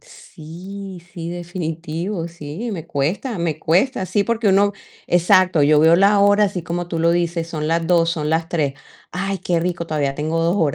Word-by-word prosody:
Sí, 190 - -10
sí, 170 -1 -6
definitivo, 170 +1 -4
sí, 170 +7 -6
me 165 -4 -6
cuesta, 175 - -2
me 165 -3 -2
cuesta. 185 +6 +1
Sí, 205 - +1
porque 230 -2 0
uno 200 +1 +4 0.4
exacto, 175 -2 +4
yo 150 +1 +5
veo 160 +2 +6
la 200 +2 +4
hora, 205 +1 +5
así 190 -4 -2
como 175 +1 -3
tú 170 -1 -4
lo 170 +1 +3
dices, 170 -1 -1
son 155 -2 -3
las 165 0 0
2, 170 -1 +3
son 155 -3 -2
las 160 +1 0
3. 150 -6 -1 0.4
"Ay, 195 +1 -3
qué 175 -2 0
rico, 170 -1 -2
todavía 145 -3 -1
tengo 155 +3 -1
2 170 +4 +1
horas, 155 -7 +1
170 Hz, 190 wpm, -20 LUFS, 160-190 Hz, 0.4 s, veo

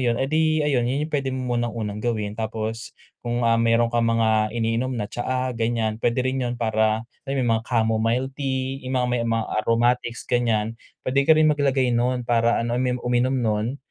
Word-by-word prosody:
yun 115 - +1
eh 135 - 0
di 155 +1 +1
ayun 125 -5 +1
yun 140 +4 0
pwede 140 -2 0
mo 130 -1 -3
munang 120 0 0
unang 105 -2 -4
gawin 105 -3 -2
tapos, 110 +1 -5 0.2
kung 120 0 -2
ah, 115 0 +3
meron 115 0 +2
kang 115 -1 +2
mga 110 -1 +2
iniinom 115 +2 0
na 105 - -2
tsaa 125 +3 -2
ganyan 115 -1 -1
pwede 120 +2 +1
rin 130 +1 -1
yun 120 -1 -1
para 110 -1 +1 0.2
alam - - -1
mo - - 0
yun 120 - +1
mga - - -14
chamomile 115 +2 +1
tea, 135 -1 -3
yung 130 - -1
mga 125 -1 +1
may 125 - +1
mga 115 -1 0 0.2
aromatics 120 +1 0
ganyan, 115 -3 0 0.3
pwede 140 +3 +1
ka 160 - +7
rin 155 -1 +5
mag-lagay 135 -3 +1
nun 125 +1 0
para 120 -1 +2
ano, 120 0 -1 0.3
uminom 125 +2 +1
nun 115 +1 -1
120 Hz, 195 wpm, -23 LUFS, 115-130 Hz, 0.3 s, ka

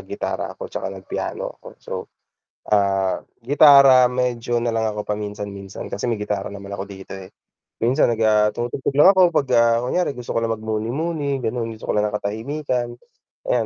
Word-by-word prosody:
gitara - - -4
ako - - -7
'tsaka - - -5
nag 95 -1 -9
piano - - -4
ako - - -13
so - - -11 0.8
ah, 95 -2 +2 0.2
gitara 140 -1 +7
medyo 125 -1 -1
nalang 110 -2 -1
ako 105 - -3
paminsan-minsan 105 -1 -6
kasi 105 - -3
may 115 - +1
gitara 105 -2 -3
naman 100 0 -9
ako 100 0 -5
dito, 95 -1 -11
eh. 95 -1 -8 0.6
Minsan 125 +6 +3
nag, - - -10
ah, 105 -1 +4
tumutugtog 120 +3 -3
lang 150 +7 +8
ako 185 -3 +4
'pag, 140 - +2
ah, 115 0 +4
kunyari 145 +3 0
gusto 125 -1 -6
ko - - +1
lang 115 -1 -1
magmuni-muni 135 +7 -2
gano'n, 115 0 -2
gusto 110 - -4
ko - - -1
lang 105 0 +2
ng 105 - -4
katahimikan. 120 +4 -2 0.6
Ayan, 120 -2 +2
115 Hz, 175 wpm, -21 LUFS, 105-130 Hz, 0.8 s, lang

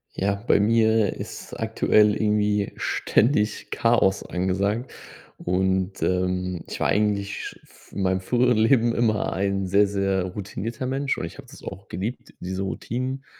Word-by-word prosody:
Ja, 100 +1 0
bei 100 0 +2
mir 110 0 +3
ist - - -8
aktuell 105 -1 +3
irgendwie 105 -1 +1
ständig 105 -3 +1
Chaos 115 -5 +2
angesagt 100 +6 -1 0.5
und, 95 +1 0
ähm, 90 -1 -1
ich - - -6
war - - +1
eigentlich 100 -1 -1
f - - -21
in 100 - -2
meinem 95 0 +1
früheren 125 +4 +2
Leben 115 +1 +4
immer 110 -3 +1
ein 95 +1 -1
sehr, 100 +2 +4
sehr 95 -1 0
routinierter 105 +6 -5
Mensch 135 +2 -1
und - - -3
ich 85 - -10
habe - - -11
das - - -14
auch 95 +1 -8
geliebt, 110 +7 -5
diese 95 +1 -3
Routinen 130 +7 -4
100 Hz, 150 wpm, -24 LUFS, 95-115 Hz, 0.5 s, Leben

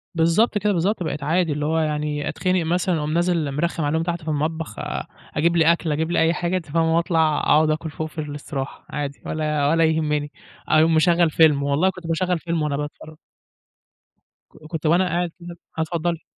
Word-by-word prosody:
بالضبط 170 +7 +3
كده، 205 0 +1
بالضبط، 185 +2 0
بقيت 150 -2 -4
عادي، 165 +1 +1
اللي 150 0 -2
هو 160 +1 +1
يعني 150 -1 -1
أتخنق 185 -2 0
مثلًا 175 +1 +1
أقوم 150 0 -2
نازل 170 -4 +1
مرخّم 165 +3 -1
عليهم 160 +3 0
تحت 170 -1 -3
في 155 - -13
المطبخ، 155 +1 -2
أ - - -4 0.3
أجيب 170 +3 +2
لي 165 0 +5
أكل 170 -2 -1
أجيب 160 +3 -1
لي 175 - +2
أي 160 +1 +3
حاجة، 175 +1 -1
أنتِ 170 - -6
فاهمة؟ 165 +1 +1
وأطلع 160 -3 +2
أقعُد 155 +1 +3
آكل 155 +1 -1
فوق 155 +1 -5
في 160 - -22
الاستراحة. 145 -2 -6
عادي 145 -1 -4
ولا 150 -2 0
ولا 165 +1 +3
يهمّني، 150 -2 0 0.4
أقوم 160 +1 +4
مشغّل 170 +1 +4
فيلم، 150 -3 +4
والله 145 +6 +2
كنت 185 -3 -8
باشغّل 180 +1 0
فيلم 170 -1 -2
وأنا 145 -2 -1
باتفرّج. 150 +1 -7 1.3
ك - - -19
كُنت 160 -1 -4
وأنا 175 +4 +3
قاعد 175 0 -1
كده 170 0 -9 0.2
آه، 160 - 0
اتفضّلي. 170 +1 -2
160 Hz, 195 wpm, -22 LUFS, 150-170 Hz, 1.3 s, لي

